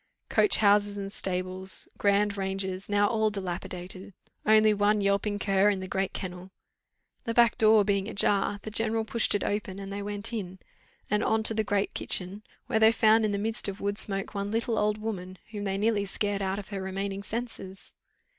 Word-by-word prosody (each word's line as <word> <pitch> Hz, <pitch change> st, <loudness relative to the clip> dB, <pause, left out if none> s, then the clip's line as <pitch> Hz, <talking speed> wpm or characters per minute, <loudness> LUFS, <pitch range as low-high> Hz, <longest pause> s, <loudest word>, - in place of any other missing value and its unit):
Coach 415 Hz, -, +4 dB
houses 205 Hz, -1 st, +3 dB
and 195 Hz, 0 st, -5 dB
stables, 185 Hz, 0 st, -1 dB
grand 205 Hz, 0 st, +2 dB
ranges, 190 Hz, -1 st, -3 dB
now 205 Hz, 0 st, +3 dB
all 220 Hz, 0 st, +1 dB
dilapidated. 185 Hz, -1 st, -5 dB, 0.3 s
Only 215 Hz, 0 st, +6 dB
one 205 Hz, +1 st, +2 dB
yelping 200 Hz, +1 st, 0 dB
cur 195 Hz, 0 st, +2 dB
in 200 Hz, -2 st, 0 dB
the 185 Hz, -, -6 dB
great 195 Hz, 0 st, -1 dB
kennel. 180 Hz, 0 st, -7 dB, 0.8 s
The 230 Hz, -, -2 dB
back 235 Hz, -2 st, +5 dB
door 215 Hz, -1 st, +6 dB
being 200 Hz, -1 st, 0 dB
ajar, 205 Hz, 0 st, +1 dB
the 215 Hz, -, -6 dB
general 225 Hz, 0 st, +1 dB
pushed 225 Hz, -1 st, +1 dB
it 205 Hz, -, -1 dB
open, 205 Hz, -2 st, -3 dB
and 195 Hz, 0 st, -7 dB
they 200 Hz, -, -4 dB
went 205 Hz, +3 st, -2 dB
in, 190 Hz, -4 st, -5 dB, 0.5 s
and 210 Hz, 0 st, +2 dB
on 220 Hz, 0 st, +1 dB
to 225 Hz, -, +2 dB
the 220 Hz, 0 st, 0 dB
great 205 Hz, -1 st, -1 dB
kitchen, 190 Hz, +3 st, 0 dB, 0.2 s
where 220 Hz, -, 0 dB
they 220 Hz, 0 st, +6 dB
found 220 Hz, 0 st, +4 dB
in 210 Hz, -, 0 dB
the 200 Hz, -, -1 dB
midst 220 Hz, +2 st, 0 dB
of 195 Hz, 0 st, -5 dB
wood 205 Hz, +1 st, -1 dB
smoke 195 Hz, -1 st, 0 dB
one 200 Hz, 0 st, -3 dB
little 225 Hz, +1 st, 0 dB
old 210 Hz, 0 st, +1 dB
woman, 190 Hz, -4 st, -5 dB
whom 205 Hz, -2 st, -5 dB
they 195 Hz, 0 st, -1 dB
nearly 210 Hz, -1 st, +1 dB
scared 200 Hz, +1 st, -1 dB
out 190 Hz, 0 st, -1 dB
of 205 Hz, -1 st, -8 dB
her 200 Hz, -2 st, -4 dB
remaining 195 Hz, +1 st, -4 dB
senses. 200 Hz, -3 st, -6 dB
205 Hz, 195 wpm, -28 LUFS, 195-215 Hz, 0.8 s, Only